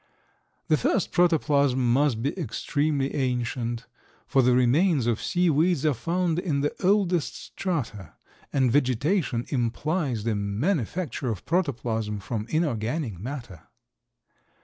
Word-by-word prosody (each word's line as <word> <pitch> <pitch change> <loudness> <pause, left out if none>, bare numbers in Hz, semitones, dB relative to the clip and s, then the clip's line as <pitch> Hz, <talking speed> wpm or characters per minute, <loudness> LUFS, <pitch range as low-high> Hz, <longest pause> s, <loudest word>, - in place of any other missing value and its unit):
The 155 - +4
first 150 - 0
protoplasm 140 -8 +3
must 130 -4 +2
be 140 - -1
extremely 145 - -1
ancient, 120 -2 -2 0.4
for 135 - +3
the 125 0 +4
remains 135 +3 +3
of 115 -2 0
sea 180 0 +1
weeds 160 0 +2
are 150 - +4
found 170 +6 0
in 150 -6 -1
the 145 - 0
oldest 185 -4 +2
strata, 115 - -4 0.4
and 130 -4 +2
vegetation 130 - +1
implies 130 - -1
the 115 0 0
manufacture 125 - -1
of 105 -6 -4
protoplasm 115 - -1
from 105 +2 -4
inorganic 125 - -1
matter. 120 - -7
135 Hz, 120 wpm, -26 LUFS, 115-160 Hz, 0.4 s, The